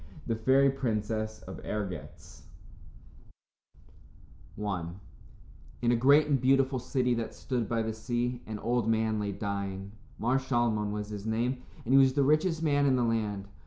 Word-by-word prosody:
The 115 - -1
Fairy 135 +4 +4
Princess 110 -4 -2
of - - -8
Ergetz 100 -4 -6 2.2
I 100 -5 -2 1.0
In 120 - +4
a - - +4
great 140 +6 +5
and 140 -4 +1
beautiful 135 0 +3
city 125 0 0
that 115 -1 -3
stood 120 -5 -2
by 115 -1 0
the 110 0 -2
sea, 120 +2 -2
an 110 -1 -4
old 120 +1 0
man 110 -1 +1
lay 100 -1 -2
dying. 100 -1 -4 0.3
Mar 125 +4 +1
Shalmon 120 -5 0
was 105 0 -4
his 105 0 -6
name, 120 +3 -1 0.2
and 125 - +1
he 135 - +8
was 135 -1 +5
the 140 0 +2
richest 155 +3 +2
man 145 -2 +3
in 130 - +4
the 125 - +1
land. 105 -4 -1
115 Hz, 160 wpm, -29 LUFS, 105-130 Hz, 2.2 s, he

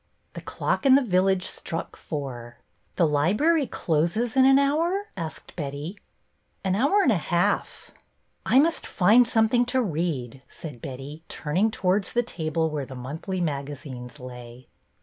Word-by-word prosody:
The - - -7
clock - - -2
in 270 -2 +7
the 275 -1 +3
village 190 -2 +2
struck 165 -2 -5
four. 125 -5 -6 0.4
The 170 - +3
library 210 - +2
closes 170 - 0
in 260 -1 +6
an 270 0 +7
hour? 335 +9 +1
" - - -40
asked 165 -5 -7
Betty. 145 +3 -5 0.7
An 190 -1 +1
hour 285 - +3
and 260 - +4
a 205 - +3
half." 175 +4 -1 0.5
I - - +3
must 320 +4 +3
find 225 +6 +5
something 225 +2 +3
to 255 +2 0
read," 150 - -2
said 145 -8 -9
Betty, 140 +3 -7
turning 175 +8 0
towards 190 -1 0
the 240 - +2
table 160 -6 -2
where 145 -3 -3
the 130 - -9
monthly 160 +9 -4
magazines 140 -4 -5
lay. 125 -1 -10
175 Hz, 150 wpm, -25 LUFS, 145-235 Hz, 0.7 s, in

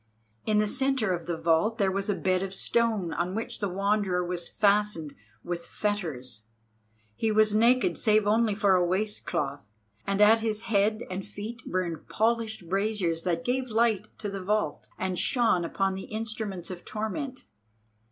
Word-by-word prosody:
In 215 -1 +3
the 210 - +4
centre 265 -3 +1
of 170 -1 -4
the 170 -2 -2
vault 165 +7 +2
there 195 -4 +2
was 195 +2 -2
a 205 - +2
bed 185 -1 +1
of 195 0 -3
stone 220 -6 +1
on 180 +2 -2
which 225 - -2
the 205 - -1
Wanderer 195 -1 +1
was 175 -1 -3
fastened 200 -7 +1 0.3
with 170 -1 -4
fetters. 140 - -3 0.7
He 220 - 0
was 215 0 +4
naked, 235 +4 +3
save 215 -2 +3
only 215 0 +3
for 200 -2 +3
a 180 -1 +4
waistcloth, 175 - -1 0.4
and 195 0 0
at 215 +2 +7
his 220 -1 -2
head 215 0 +1
and 190 +1 -3
feet 210 +4 -7
burned 175 -4 -2
polished 220 -4 0
braziers 195 -3 0
that 170 -2 -1
gave 255 +1 0
light 220 -2 +2
to 210 - -4
the 195 -1 -5
vault, 210 -6 -1
and 185 -2 -2
shone 230 -8 +2
upon 195 +3 0
the 190 0 -6
instruments 215 -5 -4
of 175 -1 -8
torment. 250 +5 -4
205 Hz, 165 wpm, -28 LUFS, 180-220 Hz, 0.7 s, at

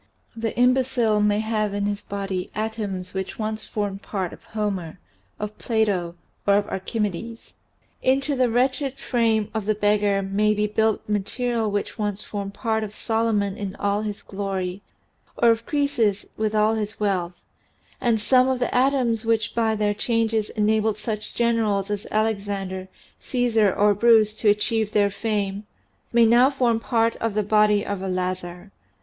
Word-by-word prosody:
The 225 0 -3
imbecile 245 -3 +3
may 210 0 +2
have 215 -2 -1
in 205 0 -1
his 205 0 -2
body 195 -3 -4
atoms 210 -4 -3
which 190 0 -4
once 215 0 -3
formed 200 -2 -3
part 190 -5 -3
of - - -14
Homer, 195 -6 -3 0.4
of 210 0 -4
Plato, 200 -7 0 0.3
or 200 - +5
of 205 0 +1
Archi 190 +4 -4
medes. 215 +3 -4 0.5
Into 275 +2 +1
the 255 -2 +2
wretched 260 +3 0
frame 225 -5 +1
of 220 -2 -3
the 215 - +2
beggar 205 -1 +2
may 210 +2 +1
be 210 0 +1
built 220 +1 0
material 220 +2 -1
which 205 +2 -3
once 210 -1 -2
formed 200 -1 -5
part 220 -2 -1
of 215 0 -7
Solomon 220 -3 0
in 200 -1 -5
all 205 +1 0
his 210 -2 -5
glory 195 -1 -4 0.6
or 235 -1 +5
of 230 0 -2
Croesus 240 -9 +1
with 215 0 -1
all 215 +1 +3
his 215 -1 -3
wealth, 185 -4 0 0.7
and 230 -2 +2
some 255 +4 +4
of 260 - +1
the 245 - -1
atoms 250 -3 +2
which 225 -1 0
by 225 -2 +1
their 210 -1 +1
changes 225 0 0
enabled 215 0 +1
such 215 -1 -4
generals 220 -4 +1
as 205 +1 -3
Alexander, 200 -3 -2 0.3
Caesar, 230 -5 +2
or 205 +2 +3
Bruce 220 0 +4
to 215 - +3
achieve 215 +1 +1
their 205 -1 +3
fame, 205 -1 -2 0.4
may 235 -1 +5
now 240 +4 +6
form 245 -5 +1
part 230 -1 +1
of 225 -2 -2
the 210 - +2
body 210 0 +3
of 200 -2 -3
a 195 - -3
lazar. 185 0 -3
215 Hz, 165 wpm, -24 LUFS, 200-230 Hz, 0.7 s, now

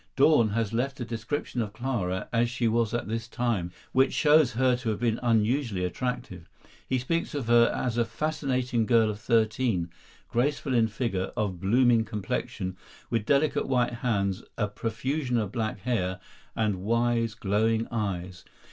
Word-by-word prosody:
Dorn 135 -5 +5
has 110 0 -1
left 130 +4 -1
a 120 - -3
description 120 +3 -3
of 105 -2 -4
Clara 105 -7 -2
as 120 0 +2
she 120 -1 0
was 115 -1 +1
at 120 -2 -2
this 115 +1 -3
time, 115 -8 -1 0.2
which 130 +1 +3
shows 150 -4 +4
her 125 +1 +3
to 125 -2 -3
have 105 - -2
been 115 -2 0
unusually 115 -3 +1
attractive. 120 -4 -4 0.4
He 130 - +2
speaks 155 +6 -2
of 140 -5 -2
her 120 0 +5
as 120 -2 -1
a 120 - +3
fascinating 125 -3 -1
girl 115 -3 +4
of 105 - -8
thirteen, 110 -5 +1 0.4
"graceful 140 +2 0
in 115 -2 +4
figure, 105 -4 -2
of 95 -4 -1
blooming 115 +4 +4
complexion, 95 -3 -4 0.3
with 115 -2 0
delicate 145 +2 +2
white 125 -2 +1
hands, 105 -5 -1 0.2
a 105 - +1
profusion 120 +6 -2
of 105 -4 -1
black 110 -4 -3
hair, 95 -6 -1 0.4
and 105 -4 0
wise, 115 +1 +1
glowing 110 +2 +1
eyes. 95 -5 -3
115 Hz, 160 wpm, -27 LUFS, 105-125 Hz, 0.4 s, Dorn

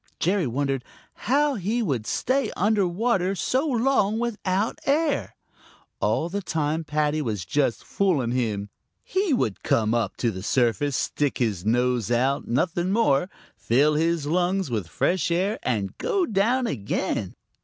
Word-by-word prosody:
Jerry 185 -2 +1
wondered 135 +1 -1 0.5
how 290 +2 +3
he 225 +2 -1
could 125 - -2
stay 260 -2 0
under 205 -1 +2
water 190 0 0
so 260 - 0
long 235 -5 +2
without 215 -3 -1
air. 295 +1 +1 0.6
All 165 - +1
the 200 +4 -3
time 160 -2 -1
Paddy 150 0 0
was 105 - -3
just 135 +4 0
fooling 155 -12 0
him. 105 -5 -2 0.3
He 380 -2 0
would 115 - 0
come 110 0 +1
up 115 -4 -1
to 120 - 0
the 95 -2 -7
surface, 125 +5 +1
stick 145 -2 -1
his 105 -6 -1
nose 120 -1 +1
out, 130 +3 +1
nothing 170 +8 0
more, 185 -6 +2 0.3
fill 140 +6 +2
his 165 0 +1
lungs 180 +1 0
with 105 -7 -2
fresh 175 - 0
air, 190 +6 0
and 105 -6 -2
go 380 -3 +1
down 235 - +1
again. 110 - -2
160 Hz, 145 wpm, -25 LUFS, 125-205 Hz, 0.6 s, how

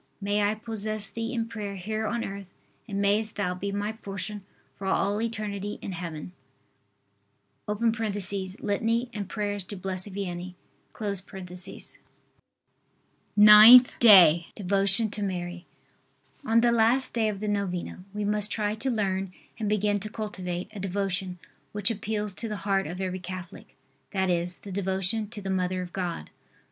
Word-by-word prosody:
May 205 +1 0
I 205 +1 +2
possess 215 -2 -2
Thee 230 +1 -4
in 230 -3 -2
prayer 210 -3 -5
here 215 +4 -3
on 235 +1 -1
earth 195 -1 -7 0.4
and 200 -3 -3
mayest 210 +2 +1
Thou 180 -3 -1
be 200 +2 -4
my 205 +1 -2
portion 200 -1 -6 0.3
for 195 - -6
all 200 +2 +1
eternity 205 -3 -3
in - - -6
Heaven. 170 -2 -6 1.4
[Litany 210 +1 0
and 200 -3 -5
prayers 205 -2 -2
to 205 - -7
Blessed 185 +1 -4
Vianney.] 185 -2 -5 2.8
NINTH 215 +4 +9
DAY. 175 -7 +8
DEVOTION 200 +2 +2
TO 210 - -5
MARY. 180 -2 -4 0.8
On 230 -3 +3
the 240 0 +4
last 235 +3 +3
day 225 -2 +1
of 200 -2 -4
the 215 - -3
novena 190 -3 -2
we 210 0 -3
must 210 0 +2
try 210 -1 0
to 230 +5 -3
learn 195 -5 -1 0.3
and 215 -2 -1
begin 205 -1 +1
to 215 +2 -6
cultivate 185 -5 -5
a 205 - -7
devotion, 190 -1 -2 0.4
which 210 +2 +1
appeals 210 -1 -3
to 225 +3 -4
the 210 - -3
heart 195 -1 +1
of 175 +3 -6
every 185 -1 -3
Catholic, 180 -1 -9 0.3
that 190 -2 0
is, 175 +1 0
the 200 - -11
devotion 190 +3 -1
to 215 -3 -8
the 195 - -2
Mother 185 0 -1
of 175 - -10
God. 180 -3 -4
200 Hz, 150 wpm, -27 LUFS, 185-215 Hz, 2.8 s, NINTH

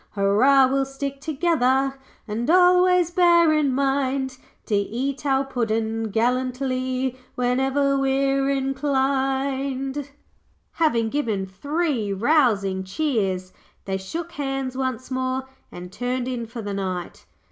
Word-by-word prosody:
'Hurrah, 225 +8 +5
we'll 270 +1 +1
stick 275 0 -5
together, 270 -4 +1 0.3
And 225 +5 -3
always 360 0 +5
bear 340 -2 +5
in 300 -3 +2
mind 270 -1 0 0.3
To - - -4
eat 250 +7 -2
our 270 0 +2
puddin' 225 -3 -1
gallantly, 255 +2 -1 0.2
Whenever 265 +3 +1
we're 270 0 +1
inclined.' 270 0 -1 0.6
Having 235 -9 +1
given 220 -8 -1
three 255 - -2
rousing 200 -5 +2
cheers, 190 -5 -1 0.3
they 190 -1 -2
shook 325 - -6
hands 270 -3 -3
once 260 -1 -3
more 260 0 -2 0.2
and 180 0 -9
turned 245 +3 -2
in 240 -3 -3
for 230 0 -7
the 205 0 -4
night. 185 -3 -5
265 Hz, 115 wpm, -23 LUFS, 230-275 Hz, 0.6 s, Hurrah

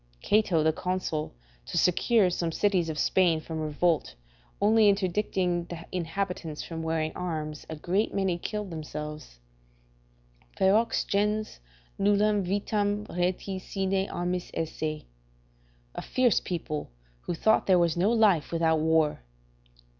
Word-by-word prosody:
Cato 200 -7 +3
the 160 0 +3
consul, 180 - -3 0.3
to - - -3
secure 185 +3 +3
some 170 -1 -1
cities 185 -2 +1
of 155 - -4
Spain 175 -2 +3
from 160 0 -6
revolt, 155 - 0 0.4
only 215 +1 +5
interdicting 185 -3 0
the 170 -1 -8
inhabitants 175 -2 -3
from 165 -1 -6
wearing 160 -1 -1
arms, 155 -4 -4
a 160 - -4
great 185 +7 0
many 190 -3 0
killed 210 0 -4
themselves: 150 - -7 1.2
"Ferox 215 +4 +3
gens, 210 +2 -1 0.4
nullam 205 +1 +3
vitam 205 +2 -1
rati 180 +2 -1
sine 195 +1 -1
armis 175 0 -3
esse." 155 -1 -3 0.9
["A - - -5
fierce 250 -4 +2
people, 155 -4 -4 0.4
who 175 - -1
thought 220 +6 +2
there 185 -2 +5
was 170 -2 +2
no 180 +4 +2
life 210 -9 +3
without 165 -1 +2
war." 160 - +2
180 Hz, 125 wpm, -28 LUFS, 160-200 Hz, 1.2 s, only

